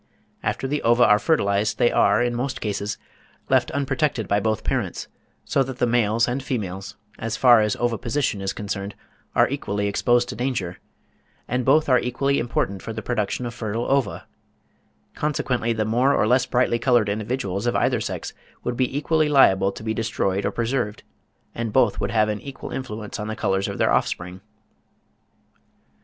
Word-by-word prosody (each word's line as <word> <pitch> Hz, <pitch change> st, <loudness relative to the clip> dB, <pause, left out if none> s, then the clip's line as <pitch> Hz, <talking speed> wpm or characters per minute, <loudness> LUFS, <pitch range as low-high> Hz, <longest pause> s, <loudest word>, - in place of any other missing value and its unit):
After 135 Hz, -, -2 dB
the 145 Hz, +2 st, -1 dB
ova 120 Hz, +1 st, +4 dB
are 105 Hz, 0 st, +5 dB
fertilised 105 Hz, -9 st, +1 dB
they 120 Hz, -, +3 dB
are, -, -, +3 dB
in 120 Hz, 0 st, 0 dB
most 130 Hz, +3 st, -2 dB
cases, 105 Hz, -1 st, -3 dB, 0.5 s
left -, -, +3 dB
unprotected 140 Hz, -4 st, -1 dB
by 100 Hz, -, +2 dB
both 110 Hz, 0 st, -1 dB
parents, -, -, -2 dB, 0.4 s
so 140 Hz, -, +1 dB
that 130 Hz, -1 st, -3 dB
the 125 Hz, -, +2 dB
males 115 Hz, -1 st, +2 dB
and 125 Hz, +2 st, -2 dB
females, 100 Hz, -7 st, -4 dB, 0.2 s
as 115 Hz, +1 st, -3 dB
far 120 Hz, -3 st, +6 dB
as 105 Hz, -1 st, +1 dB
oviposition 120 Hz, -1 st, -1 dB
is 95 Hz, 0 st, -1 dB
concerned, 100 Hz, -1 st, -5 dB, 0.4 s
are -, -, +5 dB
equally 105 Hz, -7 st, -2 dB
exposed 120 Hz, +4 st, +2 dB
to -, -, -5 dB
danger, 110 Hz, -8 st, -3 dB, 0.7 s
and 125 Hz, 0 st, -1 dB
both 150 Hz, +4 st, +4 dB
are 130 Hz, -2 st, +5 dB
equally 135 Hz, +4 st, 0 dB
important 100 Hz, -5 st, -2 dB
for 115 Hz, -, -6 dB
the 110 Hz, -, -6 dB
production 120 Hz, +1 st, -2 dB
of 120 Hz, -, -5 dB
fertile 115 Hz, +1 st, -3 dB
ova; 135 Hz, -1 st, 0 dB, 0.9 s
consequently 125 Hz, -5 st, -1 dB
the 110 Hz, -1 st, 0 dB
more 125 Hz, +6 st, +2 dB
or -, -, +2 dB
less 125 Hz, +4 st, +3 dB
brightly 120 Hz, -1 st, +1 dB
coloured 120 Hz, -3 st, +3 dB
individuals 105 Hz, -1 st, -2 dB
of 120 Hz, -, +1 dB
either -, -, +1 dB
sex -, -, -4 dB, 0.3 s
would 125 Hz, -, -2 dB
be 130 Hz, +2 st, 0 dB
equally 155 Hz, 0 st, +1 dB
liable 100 Hz, -9 st, +5 dB
to 100 Hz, -, -10 dB
be 110 Hz, 0 st, -1 dB
destroyed 105 Hz, -4 st, -1 dB
or -, -, -1 dB
preserved, 115 Hz, -3 st, -2 dB, 0.5 s
and 115 Hz, -2 st, -3 dB
both 120 Hz, -3 st, +3 dB
would 100 Hz, -, -1 dB
have 110 Hz, 0 st, +2 dB
an 105 Hz, -1 st, -3 dB
equal 140 Hz, -1 st, -8 dB
influence 110 Hz, -5 st, -5 dB
on 105 Hz, -, -4 dB
the 110 Hz, -, -3 dB
colours 95 Hz, -3 st, 0 dB
of -, -, -5 dB
their -, -, +2 dB
offspring. 90 Hz, +1 st, -1 dB
115 Hz, 175 wpm, -23 LUFS, 105-125 Hz, 0.9 s, far